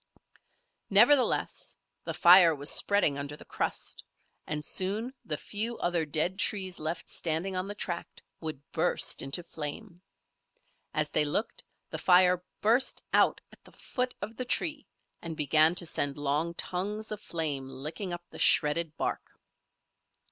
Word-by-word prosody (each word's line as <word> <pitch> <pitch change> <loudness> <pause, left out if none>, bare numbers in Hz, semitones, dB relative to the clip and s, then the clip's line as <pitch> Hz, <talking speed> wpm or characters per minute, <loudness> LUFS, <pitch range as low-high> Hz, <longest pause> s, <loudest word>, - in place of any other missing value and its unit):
Nevertheless, 245 +7 +3 0.3
the - - -4
fire 175 -2 +7
was 145 +1 0
spreading 195 -9 +3
under 145 +1 -6
the - - -14
crust - - -4 0.4
and 150 0 -3
soon 210 +7 -1
the 150 - -4
few 225 +7 -2
other 170 -3 -1
dead 170 +6 -1
trees 190 -4 0
left 160 +2 -4
standing 170 +4 -3
on 185 +1 -2
the 205 - -6
tract 175 -4 -5 0.2
would 155 -4 -6
burst - - +1
into 135 +6 -3
flame. 170 +4 -6 0.9
As 155 -1 0
they - - +4
looked, 150 +9 -2 0.3
the - - -4
fire 180 0 +4 0.2
burst 235 +5 +2
out - - +3
at - - -19
the - - -19
foot 250 -1 -4
of 220 +3 -6
the 255 - -3
tree 295 +4 -1 0.3
and 165 -2 -5
began 155 +3 +4
to 180 - +2
send 145 -3 -1
long 150 +4 -1
tongues 205 +6 -3
of 210 -1 -5
flame 145 -8 -2
licking 155 +8 -5
up 175 0 -5
the - - -10
shredded 155 +1 +3
bark. - - -4
175 Hz, 150 wpm, -29 LUFS, 155-205 Hz, 0.9 s, fire